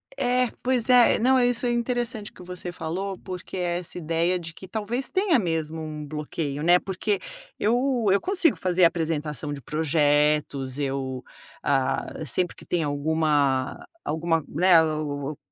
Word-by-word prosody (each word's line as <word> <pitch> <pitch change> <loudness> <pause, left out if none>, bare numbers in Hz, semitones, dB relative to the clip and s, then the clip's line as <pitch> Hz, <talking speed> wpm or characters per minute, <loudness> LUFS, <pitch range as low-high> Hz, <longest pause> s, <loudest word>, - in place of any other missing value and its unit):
É, 250 - +2 0.2
pois 250 -1 +1
é, 250 -1 +6
não, 260 +3 +4
isso 245 0 +2
é 240 - +2
interessante 235 -3 -2
que - - -15
você 180 0 -6
falou, 180 +3 -4
porque 185 0 -7
essa 175 -1 -3
ideia 170 +2 0
de 165 -1 -6
que 190 - -11
talvez 225 +6 -3
tenha 375 -3 +3
mesmo 165 -5 -2
um 155 -1 -6
bloqueio, 150 -1 -4
né, 175 +2 +6
porque 195 +2 -2 0.4
eu 245 +2 +1
eu 200 - +4
consigo 370 -5 +3
fazer 180 -1 +3
apresentação 155 -3 -1
de 145 -1 -5
projetos, 145 -3 +1
eu, 135 -2 -3 0.4
ah, 135 -1 +1 0.2
sempre 175 +6 +1
que - - -14
tem 175 -2 0
alguma 145 -2 0 0.2
alguma, 160 0 0
né, 180 +3 +4
ap 150 -2 -2
165 Hz, 145 wpm, -25 LUFS, 150-210 Hz, 0.4 s, é